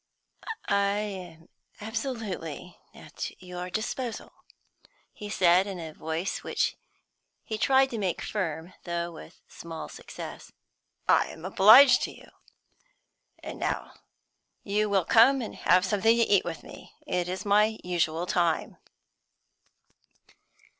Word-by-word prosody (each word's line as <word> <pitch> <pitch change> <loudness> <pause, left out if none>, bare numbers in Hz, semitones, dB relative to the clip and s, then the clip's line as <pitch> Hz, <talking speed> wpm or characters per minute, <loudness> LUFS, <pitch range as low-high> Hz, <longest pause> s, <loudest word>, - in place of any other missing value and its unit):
"I 200 0 +2
am 180 -6 -6 0.3
absolutely 215 - -5 0.2
at - - -8
your 180 0 -7
disposal," 230 +4 -4 0.8
he 210 -1 -8
said, 185 -1 +4
in 190 -3 -5
a 160 -2 -7
voice 160 +4 -3
which - - -1 0.7
he 220 -1 -5
tried 265 +3 +4
to 230 - -3
make 185 -4 -2
firm, 170 -3 -3
though 170 0 -3
with 165 - -13
small 165 -1 -8
success. - - -9 0.6
"I - - +4
am 160 - -10
obliged 240 +7 +8
to - - -7
you. - - -16 1.1
And - - -7
now - - -3 0.7
you 210 +1 0
will 195 -3 +2
come 255 +4 +6
and 235 - -5
have 180 +1 +3
something 210 +4 +3
to 235 - +4
eat 200 -4 +3
with 165 -2 -5
me; - - -13
it 180 -1 -1
is 185 +3 -4
my 210 +2 +3
usual 170 -1 0
time." 175 -2 0
190 Hz, 125 wpm, -27 LUFS, 175-215 Hz, 1.1 s, obliged